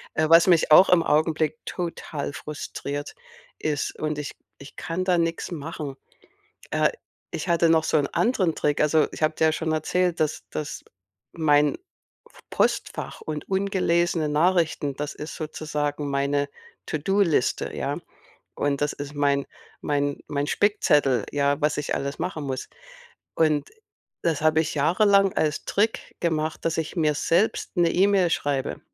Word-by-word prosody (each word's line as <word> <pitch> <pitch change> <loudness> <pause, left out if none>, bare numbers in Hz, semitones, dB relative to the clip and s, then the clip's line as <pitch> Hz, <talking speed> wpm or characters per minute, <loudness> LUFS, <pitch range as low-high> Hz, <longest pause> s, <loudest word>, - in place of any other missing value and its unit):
Äh, 155 - +2
was 165 +2 +7
mich 170 -4 +4
auch 185 +5 +8
im 180 -2 +5
Augenblick 155 0 +1
total 165 -5 -4
frustriert, 145 -1 -6 0.4
ist 150 -2 -2
und 155 -1 -2
ich 145 - -5 0.3
ich 140 - -12
kann 185 +2 -3
da 180 -2 +3
nix 165 +2 -1
machen. 150 -3 -5 0.8
Äh, - - +2 0.4
ich 165 - -5
hatte 170 -1 +3
noch 160 -1 +4
so - - +2
'n 140 - 0
anderen 195 -9 +1
Trick. 145 -1 0
Also, 150 +1 +3
ich - - -8
habe 155 0 +2
dir 160 - +3
ja 160 - +3
schon 160 0 -2
erzählt, 175 +3 0
dass 155 -1 -1
dass 150 - -5 0.5
mein 150 -3 +3 0.7
Postfach - - -1
und 150 -2 -5
ungelesene 175 -4 +1
Nachrichten 155 -2 +1
das 150 +1 -4
ist 150 +2 -7
sozusagen 150 -2 -3
meine 140 +1 0 0.4
To-do-Liste, 170 -2 +1
ja, - - -2 0.6
und 145 -1 0
das 145 - +1
ist 145 +1 -7
mein 140 -1 +1 0.4
mein 145 -1 -1
mein 145 0 -1
Spickzettel, 150 - +2
ja, 145 +1 +1
was 150 +1 +1
ich 145 - -1
alles 140 +2 -3
machen 160 -3 -3
muss. 130 -2 -4 0.7
Und 155 -2 +2 0.5
das 160 -4 0
habe 155 0 +4
ich 160 - -2
jahrelang 195 +6 +4
als 155 -1 0
Trick 215 +3 -1
gemacht, 155 -2 -1
dass 165 0 0
ich 160 +3 -3
mir 155 -3 +2
selbst 175 +8 0
'ne 170 -1 +3
E-Mail 190 -2 +3
schreibe. 140 -4 -1
155 Hz, 150 wpm, -25 LUFS, 145-170 Hz, 0.8 s, auch